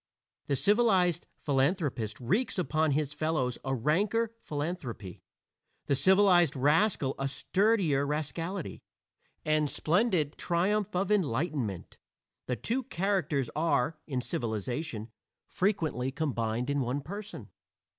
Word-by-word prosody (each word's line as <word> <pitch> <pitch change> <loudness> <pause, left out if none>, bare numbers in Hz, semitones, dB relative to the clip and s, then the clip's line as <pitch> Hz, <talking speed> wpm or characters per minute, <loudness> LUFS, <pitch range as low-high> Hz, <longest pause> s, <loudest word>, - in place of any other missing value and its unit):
The 140 - +1
civilized 190 - +3 0.2
philanthropist 135 - 0
wreaks 200 - 0
upon 160 -4 +1
his 150 0 -1
fellows 150 -5 -1
a 135 0 -1
ranker 205 - +1
philanthropy, 145 - -5 0.6
the - - +1
civilized 180 +2 +5
rascal 145 +1 +2
a 135 - 0
sturdier 185 -2 +2
rascality. 155 +5 -3 0.6
And 155 -1 +2
splendid 170 -3 +1
triumph 195 +4 0
of 190 +2 0
enlightenment! 140 - -1 0.5
the 125 - 0
two 235 - -1
characters 180 - 0
are, 155 -1 +1
in 130 -4 -2
civilization, 120 - -3 0.3
frequently 160 - -1
combined 125 -4 -1
in 145 - 0
one 130 +3 -1
person. 200 +8 -8
155 Hz, 105 wpm, -30 LUFS, 135-185 Hz, 0.6 s, civilized